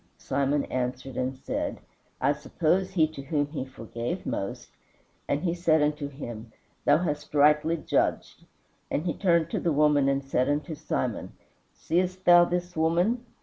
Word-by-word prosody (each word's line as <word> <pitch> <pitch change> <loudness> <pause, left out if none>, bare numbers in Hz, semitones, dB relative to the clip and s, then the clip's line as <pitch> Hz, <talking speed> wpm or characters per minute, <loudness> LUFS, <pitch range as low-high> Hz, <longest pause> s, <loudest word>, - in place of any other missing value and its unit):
Simon 140 +1 0
answered 130 +1 -3
and 130 +1 -2
said, - - -3 0.4
I 140 +3 +3
suppose 175 +5 0
he 165 -4 +3
to 155 -3 -8
whom 145 +1 0
he 145 -3 -4
forgave 130 - -5
most. 100 - -4 0.6
And 145 +2 -1
he 170 -2 +1
said 165 -3 +3
unto 150 -1 -1
him, 120 -5 -8 0.3
Thou - - +6
hast 150 -3 -3
rightly 150 +3 +4
judged. - - -1 0.5
And 155 - -1
he 170 - 0
turned 170 -4 +2
to - - 0
the 170 - 0
woman 145 -2 +3
and 140 0 0
said 130 0 +1
unto 150 +3 -1
Simon, 130 -6 -3 0.4
Seest 185 +2 -1
thou 175 0 +8
this 175 0 -3
woman? 175 +10 +1
150 Hz, 155 wpm, -27 LUFS, 135-170 Hz, 0.6 s, thou